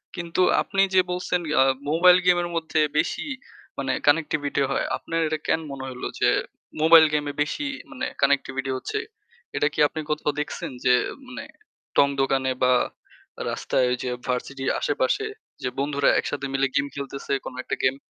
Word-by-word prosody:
কিন্তু 170 0 -2 0.2
আপনি 195 -1 0
যে 185 - +7
বলছেন 180 0 -1 0.2
আ - - +8 0.3
মোবাইল 180 +3 +6
গেমের 175 -1 +3
মধ্যে 160 -1 0 0.2
বেশি - - 0 0.5
মানে 135 -1 -1 0.2
কানেক্টিভিটি 145 -2 +2
হয়, - - 0
আপনার 165 - -3
এটা 155 0 -1
কেন - - +2
মনে 135 -1 -6
হলো 125 - -5
যে - - +4 0.5
মোবাইল 160 0 +8
গেমে 145 -1 0
বেশি 155 - -1 0.3
মানে 255 - -4 0.2
কানেক্টিভিটি 135 -1 +1
হচ্ছে? 425 - -3 0.6
এটা 145 - +2
কি - - -5
আপনি 155 - -7
কোথাও 150 0 0
দেখছেন 150 - -4
যে 125 - +6 0.3
মানে 255 - -7 0.5
টং 140 - +6
দোকানে 135 -1 +1
বা 125 - +5 0.8
রাস্তায় 125 -1 0
যে 125 - -2 0.2
ভার্সিটির 135 +1 -2
আশেপাশে - - 0 0.4
যে 130 - 0
বন্ধুরা 140 0 +2
একসাথে 140 -1 -3
মিলে 135 0 +2
গেম 140 0 +3
খেলতেছে 140 -1 -6
কোনো 125 - -7
একটা - - -2
গেম? 130 0 +3
145 Hz, 155 wpm, -24 LUFS, 135-165 Hz, 0.8 s, আ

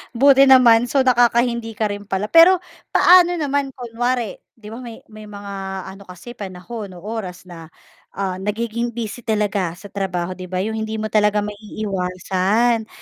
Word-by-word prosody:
Buti 275 +2 +6
naman. 245 -2 +6
So 270 +1 +2
nakaka-hindi 235 -2 +2
ka 210 -1 -1
rin 205 0 -7
pala. 195 +2 -3
Pero 350 +2 +6 0.3
paano 355 -1 +6
naman 285 -3 -2
kunwari, 240 -1 -3 0.2
'di 220 -3 -14
ba, 230 - -8
may 235 -3 -10
may 215 0 -11
mga 200 -1 -9 0.4
ano 195 0 -14
kasi 180 +7 -11
panahon 200 0 -8
o 175 - -13
oras 200 -5 -6
na, 170 -3 -11 0.5
ah, 190 -2 -3
nagiging 235 +3 -3
busy 230 0 -5
talaga 205 -5 -1
sa 200 +2 -13
trabaho, 185 -3 -3
'di 185 0 -8
ba. 185 +1 -2
'Yong 220 +1 -3
hindi 220 0 -4
mo 215 0 -4
talaga 210 -1 +2
maiiwasan, 205 +2 -1
215 Hz, 160 wpm, -20 LUFS, 195-240 Hz, 0.5 s, Buti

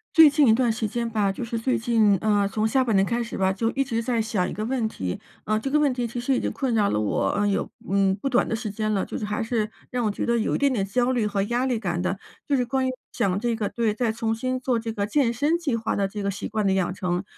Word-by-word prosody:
最 320 -2 +9
近 290 0 +4
一 220 - +6
段 240 0 +2
时 220 0 -2
间 235 +2 -2
吧， 210 -3 +1
就 195 - -5
是 230 0 -3
最 255 +3 0
近， 225 -4 +3
呃， 205 -2 +2
从 215 +2 0
下 260 +3 +2
半 230 -4 0
年 195 - +5
开 235 +4 0
始 230 - -7
吧， 190 0 +2
就 225 +4 -1
一 275 - 0
直 230 -3 -2
在 235 -1 0
想 210 -4 -1
一 - - -5
个 215 - -4
问 240 -1 0
题， 95 - -4 0.2
啊， 215 +1 0
这 270 +5 -3
个 300 - +4
问 295 -2 +3
题 245 -1 -2
其 235 +1 -4
实 260 +2 +1
已 - - +1
经 - - -2
困 260 -4 -1
扰 210 -2 +3
了 105 - 0
我 105 - 0
有， 200 - +1
呃， - - -12 0.2
嗯， 195 0 +3
不 275 - 0
短 250 -1 +2
的 - - -1
时 220 -1 -4
间 215 +1 -2
了， 195 - +1
就 - - -5
是 - - -3
还 210 +2 -2
是 225 -2 -1 0.2
让 245 -2 -1
我 210 - +1
觉 - - -4
得 235 0 +1
有 220 - 0
一 - - 0
点 280 -1 +3
点 205 -6 0
焦 245 +5 +1
虑 240 -4 +1
和 205 -1 0
压 240 +5 0
力 250 -4 0
感 175 -5 -2
的。 190 +2 -2 0.3
就 285 - +2
是 255 - +2
关 260 +2 0
于 - - 0 0.2
想 190 0 0
这 235 +1 0
个 215 -2 -1
对， 230 -2 0
再 235 -1 0
重 225 0 -1
新 255 +3 -2
做 255 -1 0
这 225 0 -4
个 200 -2 -2
健 240 0 +2
身 290 +7 +1
计 310 -8 -1
划 225 -1 -1
的 200 -1 +1
这 205 +1 -6
个 200 - -1
习 195 - -4
惯 215 -2 -1
的 190 - +3
养 185 -2 0
成， 180 -1 -2
225 Hz, 330 characters per minute, -25 LUFS, 205-245 Hz, 0.3 s, 最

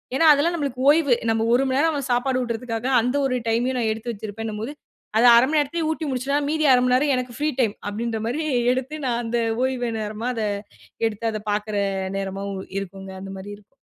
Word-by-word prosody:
ஏன்னா, 325 - +3
அதெல்லாம் 300 +4 +1
நம்மளுக்கு 275 -5 -3
ஓய்வு. 295 -3 +4 0.2
நம்ம 225 0 +1
ஒரு 250 +3 +4
மணி 260 0 0
நேரம் 325 +3 +3
அவன் 280 -2 -3
சாப்பாடு 255 +1 +1
ஊட்டுறதுக்காக 235 0 -3
அந்த 250 +4 -1
ஒரு 255 -2 0
டைம்மையும் 240 +3 +1
நான் 225 -2 +1
எடுத்து 220 +2 -4
வச்சிருப்பேன்னும்போது, 220 +2 -5 0.5
அத 225 - +4
0:30 235 +2 +6
மணி 310 +2 +1
நேரத்திலே 310 +3 -1
ஊட்டி 315 0 -3
முடிச்சேனா, 270 +2 0
மீதி 310 0 +1
0:30 250 - +5
மணி 250 0 +2
நேரம் 280 +2 +2
எனக்கு 250 -1 -4
ஃப்ரீ 300 +1 +1
டைம் 225 -5 +2 0.2
அப்பிடின்ற 225 +2 -3
மாரி 260 +7 -1 0.3
எடுத்து 265 +4 -3
நான் 240 -2 0
அந்த 235 +1 0 0.2
ஓய்வு 255 -2 -1
நேரமா 215 +3 -3
அத 225 - -2 0.6
எடுத்து 220 0 -5
அத 215 - -4
பார்க்கிற 210 +1 -2 0.4
நேரமாவும் 195 0 -4 0.2
இருக்குங்க 195 0 -8
அந்த 195 0 -7
மாரி 200 +2 -8
இருக்கும். 210 0 -25
240 Hz, 200 wpm, -23 LUFS, 220-270 Hz, 0.6 s, 0:30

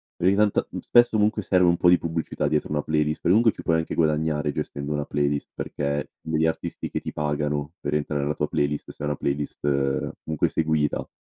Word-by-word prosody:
perché 95 +3 +2
tant 105 -1 +2
mhmm, - - -5
spesso 120 -2 +4
comunque 105 +1 +2
serve 90 -1 +3
un 85 - +4
po' 90 - +4
di 90 - +7
pubblicità 80 -1 -2
dietro 75 -1 0
una 75 -1 +1
playlist, 75 0 0
per 85 - +2
comunque 115 +2 +5
ci - - -10
puoi 80 -2 +2
anche 80 - -2
guadagnare 75 -2 +1
gestendo 70 +1 -4
una 75 -1 -1
playlist 70 0 -1
perché 70 -1 -3
degli 80 0 +1
artisti 80 - -3
che - - -3
ti - - -5
pagano 75 0 -2
per 75 - -1
entrare 75 -1 -1
nella 75 +1 0
tua - - -1
playlist, 75 0 -1
se - - -9
è - - 0
una 75 - 0
playlist, 70 +1 -3 0.6
comunque 80 -1 0
seguita, 80 -2 0
75 Hz, 210 wpm, -25 LUFS, 75-85 Hz, 0.6 s, di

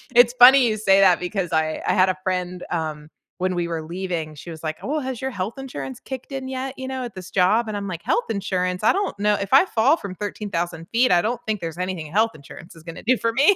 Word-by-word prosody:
It's 240 0 +6
funny 255 +1 +9
you 215 -1 0
say 195 -2 +4
that, 185 -3 +5
because 180 -1 -3
I 155 0 0
I - - +3
had 185 0 +4
a 185 - -1
friend, 180 -1 -2
um, 155 -2 -3 0.3
when 185 0 0
we 170 -1 -1
were 165 -2 -3
leaving, 170 -2 -4
she 170 - -10
was 160 0 -10
like, 155 0 -3
"Oh, 300 +2 -1
has 260 -3 -5
your 265 - -1
health 200 +2 -4
insurance 140 - -6
kicked 265 +1 -8
in 265 -1 -4
yet, 265 0 -4
you 260 - -5
know, 260 -1 -4
at 240 - -6
this 185 -1 -8
job?" 210 +5 +3
And 210 -1 -3
I'm 200 0 -4
like, 170 -3 -5
"Health 240 - +1
insurance?" 185 -3 -2
I - - +5
don't 395 - -2
kno 210 0 +3
if 200 +3 -4
I 280 +8 +7
fall 270 0 +3
from 190 -2 -7
13,000 175 -5 -4
feet, 245 +2 +3
I 175 -1 +5
don't 230 +5 -2
think 215 -2 -1
there's 165 -1 -5
anything 180 -4 -4
health 220 +4 +2
insurance 155 +4 -13
is 165 - -14
gonna 165 0 -9
do 255 +1 +4
for 230 - 0
me. 290 - +5
195 Hz, 255 wpm, -23 LUFS, 175-240 Hz, 0.3 s, funny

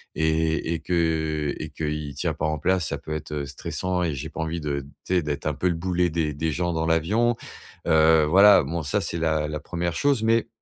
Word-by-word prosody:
et 80 +1 +1
et 80 - -2
que 80 -4 0
et 75 - -5
qu'il 75 -1 -4
tient - - -1
pas 75 - -3
en 75 0 -1
place, 90 +1 +1
ça 70 - -2
peut 75 +2 -7
être, 75 0 -6
heu, 70 -1 -2
stressant, 90 +6 -3
et 80 -4 -1
j'ai 80 +4 -5
pas 80 - -9
envie 80 +1 -3
de 70 -2 -2 0.2
tu 95 - -2
sais, 90 - +3
d'être 75 -2 -4
un - - +1
peu 90 - -1
le 85 - 0
boulet 90 +1 0
des 80 -2 -1
des 80 +2 -1
gens 85 +2 -1
dans 80 0 -1
l'avion. 105 +9 +2 0.5
Heu, 80 -1 +5
voilà, 100 +2 +7
bon, 80 +4 -3
ça 75 +8 0
c'est 85 - -2
la 80 -2 +1
la 75 0 -4
1re 85 +1 -3
chose, 140 -2 +1
mais, 115 0 +2
80 Hz, 230 wpm, -24 LUFS, 75-85 Hz, 0.5 s, voilà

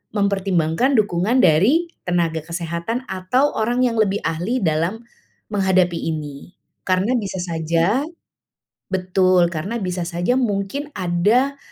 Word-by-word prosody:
mempertimbangkan 200 - +1
dukungan 210 +2 +2
dari 235 - +4 0.2
tenaga 170 -2 0
kesehatan 170 +7 -4
atau 190 +10 +1
orang 240 +3 +1
yang 235 -3 +1
lebih 205 -1 +2
ahli 175 +10 -1
dalam 170 +7 0 0.4
menghadapi 190 -4 +2 0.2
ini. 150 0 -7 0.3
Karena 190 +7 +1
bisa 195 -5 -3
saja 170 - 0 0.9
betul, 185 -1 +2
karena 185 +8 -4
bisa 180 -1 -2
saja 175 +7 0
mungkin 235 +5 -2
ada, 210 +11 +1
185 Hz, 115 wpm, -21 LUFS, 170-225 Hz, 0.9 s, dari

